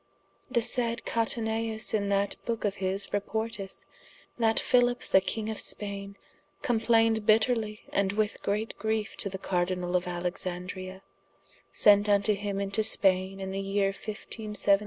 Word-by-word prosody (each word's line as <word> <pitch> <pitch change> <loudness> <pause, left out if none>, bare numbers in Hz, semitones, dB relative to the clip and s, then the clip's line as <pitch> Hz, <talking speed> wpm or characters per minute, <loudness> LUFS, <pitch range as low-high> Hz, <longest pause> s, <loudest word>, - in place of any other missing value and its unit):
The 235 -2 +1
saide 235 -1 0
Cataneus 225 -1 0
in 200 -2 +1
that 200 0 +1
booke 230 -2 -2
of 200 -1 -1
his 190 +1 -1
reporteth, 205 -1 -3 0.6
that 225 -1 +3
Philip 245 0 +3
the 190 - +4
king 215 +3 -3
of 220 -1 -4
Spaine 200 -1 -4 0.5
complained 225 -2 +2
bitterly 220 -1 +2
and 195 -1 +2
with 210 0 -1
great 210 +2 -2
griefe 220 0 -1
to 200 - +1
the 190 - -5
Cardinall 180 -1 -1
of 180 0 +1
Alexandria, 180 +2 -3 0.7
sent 205 0 +5
vnto 205 +1 +3
him 200 0 -3
into 200 +2 0
Spaine 195 -2 +2
in 190 0 -4
the 195 +1 -2
yeere 195 0 0
1572. 210 -1 -1
205 Hz, 140 wpm, -28 LUFS, 195-220 Hz, 0.7 s, sent